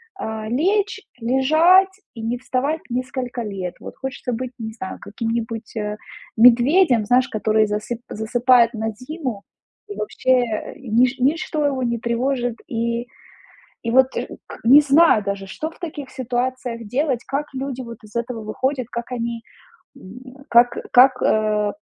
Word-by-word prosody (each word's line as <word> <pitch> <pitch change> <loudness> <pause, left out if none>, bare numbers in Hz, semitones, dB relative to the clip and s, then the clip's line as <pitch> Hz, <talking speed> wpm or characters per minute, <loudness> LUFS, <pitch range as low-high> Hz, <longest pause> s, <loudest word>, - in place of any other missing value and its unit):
а, 220 - -5
лечь, 400 - +1 0.2
лежать 310 +10 +4 0.3
и 225 - -7
не 235 +2 -2
вставать 280 +6 -1
несколько 250 0 -3
лет, 190 -4 -5
вот - - -9
хочется 265 -1 -5
быть, 255 +2 -4
не 220 0 -5
знаю, 190 -4 -7
каким-нибудь, 230 +1 -4
э, 210 0 -3 0.4
медведем, 245 - +5
знаешь, 250 +3 +3
который 215 -1 +2
засып 215 +3 -3
засыпает 235 +2 +3
на 220 0 -2
зиму 255 - -6 0.5
и, 410 - -6
вообще, 220 +4 -1
э, 225 -3 -4
нич 250 +1 +1
ничто 300 +2 0
его 265 -3 0
не 235 -1 -1
тревожит, 240 0 -1
и 235 +1 -2 0.8
и 230 - -2
вот 260 0 +6
ш - - -2 0.2
к - - -10
не 270 +6 +8
знаю 280 -6 +5
даже, 200 -1 -3
что 310 +11 -5
в - - -19
таких 295 -5 -6
ситуациях 250 -2 -3
делать, 260 -1 0
как 290 +2 -2
люди 260 -1 -4
вот 235 -1 -9
из 215 +2 -12
этого 235 -1 -3
выходят, 255 +3 -2
как 235 +1 -5
они, 235 -1 -3 0.6
м, 255 +7 -13
как 240 +1 +5
как, 255 +1 +6
а, 210 -1 +1
245 Hz, 150 wpm, -21 LUFS, 225-265 Hz, 0.8 s, не